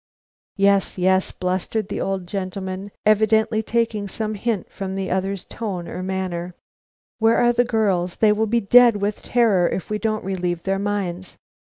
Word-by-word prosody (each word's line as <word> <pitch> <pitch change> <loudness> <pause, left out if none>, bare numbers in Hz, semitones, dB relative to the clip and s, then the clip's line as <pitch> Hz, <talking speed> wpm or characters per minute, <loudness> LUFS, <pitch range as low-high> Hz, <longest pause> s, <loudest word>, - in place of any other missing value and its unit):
"Yes, 200 -1 +2
yes," 185 +1 +2
blustered 185 +3 -2
the - - -3
old 195 -2 -2
gentleman, 190 +1 -5 0.2
evidently 220 +1 +3
taking 225 -2 -1
some 215 +2 -3
hint 215 -1 -2
from 190 -1 -5
the 195 -1 -3
other's 190 +1 -2
tone 190 -7 -5
or - - -6
manner. 185 -2 -3
"But - - -21
where 225 +1 +5
are 240 0 +4
the 240 +1 +3
girls? 195 -7 0
They 215 -1 +4
will 220 +1 +1
be 235 +2 +1
dead 240 +2 +6
with 205 +1 -2
terror, 215 -8 +2
if 190 - -4
we 210 - -1
don't 215 -2 -2
relieve 180 -3 -2
their 195 0 -1
minds. 195 -3 -3
200 Hz, 170 wpm, -22 LUFS, 185-220 Hz, 0.2 s, dead